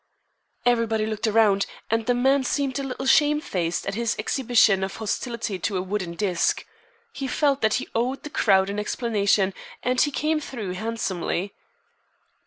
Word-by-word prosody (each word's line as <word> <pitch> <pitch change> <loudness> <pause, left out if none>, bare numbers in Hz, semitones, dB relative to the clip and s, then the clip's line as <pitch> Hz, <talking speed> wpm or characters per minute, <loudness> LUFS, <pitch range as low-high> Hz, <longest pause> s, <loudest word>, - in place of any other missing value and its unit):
Everybody 230 -3 +2
looked 215 +1 -2
around, 210 -3 +3 0.2
and 225 0 0
the 245 - +3
man 265 +2 +3
seemed 275 +1 -1
a - - -3
little 265 0 -5
shamefaced 270 - +2
at 195 - -2
his 230 +2 -1
exhibition 225 -7 +3
of 195 0 -4
hostility 220 -2 -3
to 190 +4 -1
a - - 0
wooden 185 -3 -3
disk. 185 -3 0 0.5
He 275 - -4
felt 280 +1 +1
that 220 0 +3
he 255 - -2
owed 250 +4 -1
the 300 - -7
crowd 195 -6 +3
an 205 - -3
explanation 205 -3 +1 0.3
and 250 0 +2
he 290 - +3
came 305 +2 0
through 230 -10 -5
handsomely. 200 -3 -3
225 Hz, 160 wpm, -24 LUFS, 200-255 Hz, 0.5 s, around